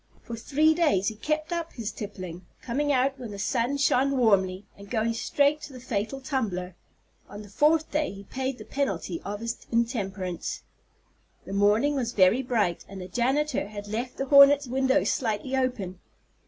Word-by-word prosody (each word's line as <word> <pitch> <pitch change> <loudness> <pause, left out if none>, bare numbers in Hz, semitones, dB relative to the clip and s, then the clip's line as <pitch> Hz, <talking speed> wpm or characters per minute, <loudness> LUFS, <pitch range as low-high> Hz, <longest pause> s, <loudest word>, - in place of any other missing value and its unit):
For 235 - -6
three 300 +7 +2
days 295 - +2
he 220 - -9
kept 305 +7 -2
up 335 -1 -3
his 230 -2 -4
tippling, 185 -4 -7 0.2
coming 290 +4 0
out 270 0 +1
when 245 -3 -6
the 205 - -7
sun 235 +6 0
shone 275 0 +2
warmly, 195 -5 +2
and 200 0 -13
going 230 -1 0
straight 285 +5 +1
to 300 -2 -9
the 255 - -9
fatal 240 +1 -3
tumbler. 215 -10 -2 0.6
On 205 +1 -8
the 205 - -13
fourth 310 +8 +2
day 300 0 0
he 200 0 -10
paid 260 +4 -3
the - - -10
penalty 195 -11 -2
of 205 +1 -5
his 230 0 -3
intemperance. 200 -7 -2 0.8
The 195 - -7
morning 210 +8 +3
was 245 -4 -2
very 190 +6 +4
bright, 220 -9 0
and 195 0 -8
the 180 - -7
janitor 260 +4 0
had 205 0 -8
left 235 +4 -4
the 270 - -1
hornet's 280 +1 +7
window 265 +2 +2
slightly 230 +2 -1
open. 220 -9 -2
235 Hz, 175 wpm, -27 LUFS, 200-275 Hz, 0.8 s, hornet's